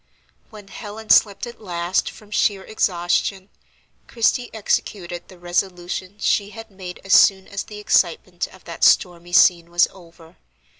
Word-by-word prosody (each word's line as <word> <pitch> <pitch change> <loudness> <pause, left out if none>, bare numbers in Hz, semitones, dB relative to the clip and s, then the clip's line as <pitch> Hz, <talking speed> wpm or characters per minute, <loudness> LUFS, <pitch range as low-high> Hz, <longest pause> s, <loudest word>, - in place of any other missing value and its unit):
When 210 -3 -13
Helen 215 +2 -6
slept 200 -3 +4
at 240 -1 -11
last 175 -2 -1
from 210 -1 -15
sheer 200 -2 +1
exhaustion, 190 0 -1 0.6
Christie 240 +1 0
executed 185 -4 -3
the 185 - -15
resolution 180 +2 -3
she 205 -1 +1
had 225 0 -11
made 185 -2 -9
as 195 - 0
soon 190 -1 +5
as 200 - -4
the 210 - -10
excitement 180 -3 0
of 190 - -18
that 170 -1 -7
stormy 175 -1 +3
scene 170 -1 +5
was 175 +1 +3
over. 170 -2 -17
190 Hz, 145 wpm, -21 LUFS, 175-205 Hz, 0.6 s, soon